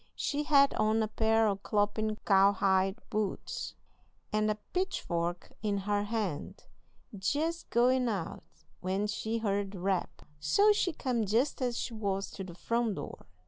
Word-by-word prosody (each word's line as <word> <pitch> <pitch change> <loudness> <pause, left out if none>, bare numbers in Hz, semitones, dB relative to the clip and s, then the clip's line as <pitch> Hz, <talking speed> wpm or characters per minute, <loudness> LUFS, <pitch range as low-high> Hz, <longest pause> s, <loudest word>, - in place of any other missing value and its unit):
She 295 0 -1
had 280 -2 +5
on 220 +1 +2
a - - 0
pair 220 +1 +2
o' 200 - +2
clompin' 210 +1 0
cowhide 195 0 +4
boots, 210 -3 -3 0.6
and 215 0 +2
a 215 - +1 0.2
pitchfork 175 - -2
in 205 -2 0
her 205 +1 0
hand, 205 -8 -3 0.5
jest 310 - -1
goin' 250 +1 +3
out, 200 -1 -3 0.4
when 190 +3 -1
she 220 +2 -2
heard 205 -3 0
the 190 - -7
rap. 190 -1 -1 0.2
So 405 - +4
she 385 -3 +1
come 245 -8 -1
jest 240 +8 +1
as 245 -2 0
she 235 - -3
was 200 -3 -2
to 195 - -6
the 175 -2 -9
front 230 +1 0
door. - - -8
215 Hz, 150 wpm, -31 LUFS, 195-235 Hz, 0.6 s, had